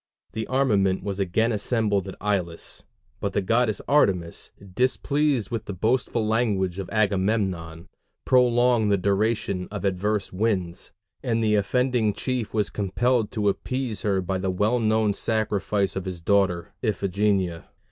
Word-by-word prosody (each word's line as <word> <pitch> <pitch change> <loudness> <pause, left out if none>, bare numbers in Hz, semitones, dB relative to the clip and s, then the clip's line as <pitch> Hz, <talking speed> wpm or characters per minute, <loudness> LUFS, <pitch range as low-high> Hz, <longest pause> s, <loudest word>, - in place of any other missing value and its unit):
The 110 0 -4
armament 105 -8 +2
was 100 -1 -4
again 105 +5 +1
assembled 105 -2 0
at 95 - -7
Aulis, 90 -5 -3 0.3
but 100 -1 -3
the 100 - +1
goddess 115 +1 +1
Artemis, 95 - +1 0.2
displeased 130 +1 +1
with 115 -2 -3
the 100 - -5
boastful 115 +2 0
language 100 -5 0
of 95 - -5
Agamemnon, 95 -5 0 0.4
prolonged 120 -3 +3
the 100 - +4
duration 100 -1 0
of 105 -1 -5
adverse 100 +2 -1
winds, 95 -4 -1 0.3
and 115 -3 0
the 105 -1 +2
offending 115 +1 +1
chief 125 -2 -3
was 105 -2 -1
compelled 110 +3 0
to 105 -2 0
appease 125 +3 -2
her 100 -3 +1
by 95 +1 -2
the 95 0 -1
well 105 +6 +1
known 110 -2 +2
sacrifice 105 -3 -1
of 95 -1 -3
his 90 -2 -5
daughter 90 -1 +1
Iphigenia. 100 -4 0
105 Hz, 140 wpm, -25 LUFS, 95-115 Hz, 0.4 s, the